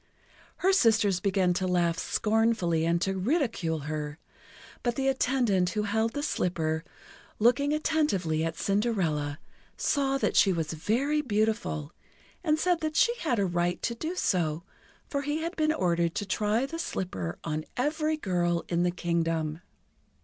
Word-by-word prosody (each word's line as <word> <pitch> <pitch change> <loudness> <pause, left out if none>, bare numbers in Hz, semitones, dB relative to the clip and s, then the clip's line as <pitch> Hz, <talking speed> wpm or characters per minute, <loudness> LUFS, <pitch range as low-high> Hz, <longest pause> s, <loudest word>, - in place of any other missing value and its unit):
Her 385 +2 +3
sisters 220 - +4
began 185 -2 +2
to 185 +1 -1
laugh 170 -2 +1
scornfully 215 -7 +1
and 170 +1 +2
to 195 0 0
ridicule 215 - 0
her; 150 0 -4 0.6
but 240 -1 -1
the 270 +1 0
attendant 245 -9 +2
who 210 +4 -1
held 220 +2 0
the 290 - -3
slipper, 160 - -1 0.5
looking 250 +6 +3
attentively 295 - +1
at 165 0 -2
Cinderella, 180 -9 0 0.4
saw 275 -2 +1
that - - 0
she 195 - +5
was 165 -3 -2
very 250 - 0
beautiful, 215 - -1 0.5
and 310 -3 +2
said 355 +1 +2
that 310 -1 -3
she 475 - +4
had 255 - 0
a 200 - +2
right 175 0 0
to 235 - 0
do 315 +9 -4
so, 170 - 0 0.4
for 280 - -2
he 295 +3 -2
had 335 +2 -3
been 310 -1 +2
ordered 170 - +1
to 205 - -2
try 210 +5 +1
the 330 +4 -6
slipper 95 - -3
on 155 -1 -2
every 305 +4 0
girl 175 - 0
in 170 0 +1
the 175 - +3
Kingdom. 165 -2 -1
200 Hz, 155 wpm, -28 LUFS, 170-270 Hz, 0.6 s, she